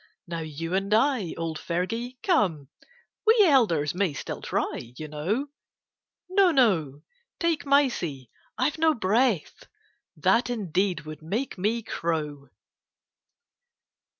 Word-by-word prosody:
Now 170 -1 -4
you 160 +2 -5
and 195 +1 0
I, 225 - +1
old 165 -1 -3
Fergie, 225 +9 -3
come, 170 - +1 0.5
We 450 +1 +5
elders 205 - +3
may 180 -3 0
still - - -6
try, 120 +1 -3
you 155 - -6
know, 185 - -2 0.8
No, 375 0 +4
no! 170 - +2 0.4
take 335 -4 0
Mysie, 180 - +1 0.3
I've 290 +5 0
no 320 -1 +4
breath, 220 - +1 0.5
That 235 +1 +2
indeed 190 -5 0
would 155 0 -9
make 210 - -3
me 220 +5 -1
crow 150 -7 -3
190 Hz, 115 wpm, -26 LUFS, 155-255 Hz, 0.8 s, We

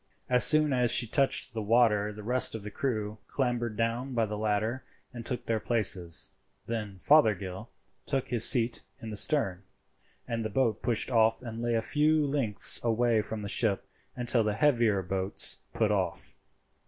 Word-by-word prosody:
As 125 -1 +5
soon 155 -2 +5
as 125 -1 +1
she 120 - +2
touched 135 +1 0
the 110 - -4
water 105 -1 +2
the 105 0 -11
rest 130 +2 +3
of 110 - -7
the 105 - -7
crew 110 -4 -4
clambered 120 -4 -3
down 120 +3 -3
by 115 -1 +1
the 105 0 -5
ladder 110 +4 -2 0.3
and 120 -1 -8
took 125 0 -6
their 115 -1 -1
places; 95 -8 +1 0.3
then 105 -4 -5
Fothergill 105 - +1 0.4
took 135 -2 -2
his 120 -3 +2
seat 120 -2 +2 0.2
in 110 - -8
the - - -6
stern, 105 - +2 0.7
and 115 -2 -3
the 110 - -3
boat 110 -1 -1
pushed 120 +1 0
off 115 0 +2
and 115 -1 -7
lay 120 0 -1
a 115 - -1
few 155 +2 +1
lengths 135 -8 +1
away 115 -1 +1
from 105 0 -7
the - - -5
ship 100 -1 -1 0.3
until 120 -1 0
the 105 -1 -2
heavier 115 -7 +1
boats 95 +1 +2
put 110 -2 0
off. 95 -5 -3
115 Hz, 175 wpm, -28 LUFS, 105-125 Hz, 0.7 s, As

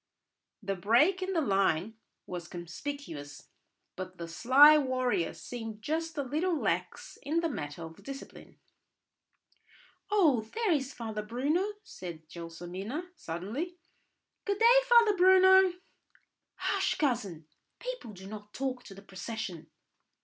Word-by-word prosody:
The 195 0 -1
break 240 - +3
in 375 +1 -2
the 330 - +2
line 195 - +1 0.3
was 175 -1 -6
conspicuous; 170 - -7 0.5
but 185 -1 -7
the 170 - -6
sly 260 - +7
warrior 255 - +1
seemed 225 -3 -8
just 325 +3 -2
a 285 - 0
little 315 +5 0
lax - - -2
in 310 +4 0
the 335 - +1
matter 145 - -5
of 160 0 -10
discipline. 275 0 -10 1.5
"Oh, 330 - +4
there 450 -4 +1
is 275 -4 0
Father 220 -4 -5
Bruno!" 290 - 0
said 165 - -9
Gelsomina 180 - -6
suddenly. 225 - -5 0.7
"Good 400 -1 -1
day, 470 +3 +7
Father 465 -4 +6
Bruno." 375 0 +6 0.8
"Hush, - - 0
cousin! 215 - -1 0.3
People - - -6
do 190 0 -11
not 210 +1 -10
talk 260 -2 -2
to 195 - -11
the 195 - -13
procession." 195 -3 -6
245 Hz, 125 wpm, -30 LUFS, -, 1.5 s, sly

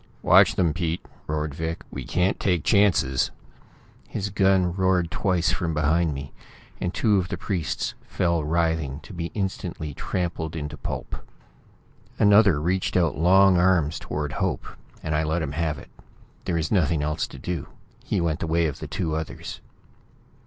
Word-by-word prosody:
"Watch - - +6
them, 85 -4 +2
Pete!" 85 -1 -2 0.2
roared 75 -1 -2
Vic. 80 +1 -4
"We - - -6
can't 90 +2 +1
take 90 -6 +1
chances!" 90 - +3 0.8
His 100 0 -3
gun 95 -2 +3
roared 95 -3 +1
twice 90 -1 +1
from 85 -4 -1
behind 75 +1 +2
me, 70 +1 -7 0.5
and 90 - -1
two 105 0 +2
of 90 - -2
the - - -4
priests 90 -7 -2
fell 85 -3 0
writhing, 80 -3 0
to 95 - -12
be 85 -2 -3
instantly 95 -6 -3
trampled 85 -2 -3
into 75 -1 -4
pulp. 65 - -5 1.0
Another 100 -6 +5
reached 90 +4 0
out 85 -4 +2
long 95 +4 +5
arms 85 -4 +2
toward 75 -1 -3
Hope, - - -2 0.4
and 80 - -2
I 75 - +2
let 80 +2 0
him 70 - -3
have 80 -1 -1
it. - - -13 0.5
There 90 - -1
was 80 -2 -1
nothing 80 -6 +2
else 75 +1 -1
to - - -11
do. 85 +2 -4 0.4
He - - -1
went 85 -3 0
the - - -2
way 85 +1 +2
of 75 - -3
the 80 - -6
two 80 +2 -2
others. 80 0 -6
85 Hz, 165 wpm, -25 LUFS, 75-90 Hz, 1.0 s, Watch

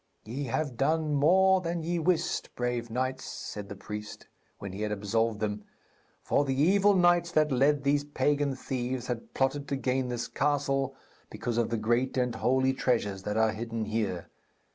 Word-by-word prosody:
'Ye 130 +6 -4
have 130 0 -2
done 155 +3 +1
more 185 +6 +5
than 170 -1 -3
ye 170 +1 -1
wist, 175 +1 0
brave 120 -1 -2
knights,' 130 +3 -2
said 105 -1 -7
the 100 - -6
priest, 105 +2 -7 0.3
when 100 -2 -7
he 100 - -6
had 105 0 -1
absolved 105 +2 0
them; 105 -1 -2 0.6
'for 145 - +2
the 135 -1 -1
evil 200 +6 +4
knights 175 -1 +4
that 155 -2 +3
led 140 +2 +3
these 145 +1 +2
pagan 145 -1 0
thieves 130 -1 -3
had 120 -2 -5
plotted 140 +2 0
to 140 - -1
gain 130 -1 0
this 120 -1 -3
castle 135 -1 0 0.3
because 120 -1 -2
of 115 - +1
the 115 - -1
great 120 +5 0
and 125 -1 +1
holy 130 +1 +2
treasures 110 -7 0
that 105 +2 -3
are 110 0 +3
hidden 115 0 -4
here. 105 -5 -2
130 Hz, 175 wpm, -29 LUFS, 115-145 Hz, 0.6 s, more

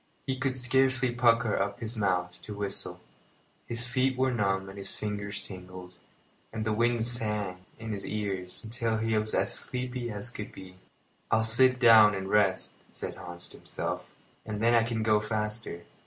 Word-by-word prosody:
He 130 - -1
could 130 0 -1
scarcely 130 0 +2
pucker 115 -2 +3
up 100 +2 -1
his 115 0 -3
mouth 90 -4 -1
to 105 - -7
whistle. 100 -1 -1 0.7
His 120 +1 -1
feet 130 +1 +1
were 130 0 +2
numb 95 -4 0
and 95 - -9
his 95 - -5
fingers 105 -1 -4
tingled, 90 -1 -10 0.6
and 110 -1 -3
the 110 - +1
wind 115 +1 +2
sang 105 -6 -2
in 115 0 -6
his 100 -2 -4
ears 100 -2 -2
till 115 -2 0
he 110 0 0
was 110 0 0
as - - +2
sleepy 125 -1 -2
as 105 +2 -4
sleepy 105 - -5
could - - -16
be. 95 -1 -11 0.5
"I'll 110 +1 +3
sit 125 +3 +5
down 110 -4 +8
and 95 0 -4
rest," 100 -3 +2 0.2
said - - -5
Hans 85 0 -7
to - - -13
himself, - - -4 0.3
"and 105 -1 -4
then 115 +2 +3
I 115 - +6
can 115 -1 -1
go 110 -1 +4
faster." 105 -4 -3
110 Hz, 180 wpm, -29 LUFS, 100-120 Hz, 0.7 s, down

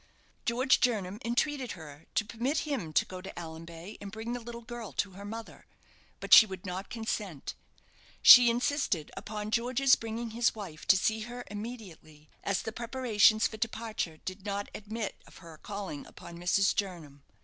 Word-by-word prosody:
George 250 +3 +3
Jernam 210 -5 0
entreated 255 +2 0
her 155 -3 -12
to 220 - +2
permit 240 +8 -1
him 260 - -3
to - - +3
go 185 -1 -8
to 190 - -8
Allanbay 165 +3 -8
and 200 -1 -7
bring 225 +3 -5
the 245 - -3
little 235 0 -8
girl 240 -2 -7
to 200 - -1
her 195 +2 -10
mother, 225 +2 -8 0.5
but - - +1
she 220 - +11
would 190 -1 -8
not 185 +1 -5
consent. 210 - -4 0.7
She 245 -1 +11
insisted 240 - 0
upon 210 0 -5
George's 255 +3 +4
bringing 230 +1 -5
his 230 0 +1
wife 185 -8 -8
to 190 - +7
see 220 +3 +1
her 245 0 -6
immediately, 200 -9 -9
as 200 -2 0
the 220 - -4
preparations 230 -2 +3
for 220 - -2
departure 220 -7 -3
did 185 +1 -6
not 200 0 -3
admit 215 0 -5
of - - -16
her 165 -3 -13
calling 200 -8 -6
upon 170 - -11
Mrs. 195 +3 +3
Jernam. 165 -8 -4
215 Hz, 170 wpm, -30 LUFS, 185-235 Hz, 0.7 s, she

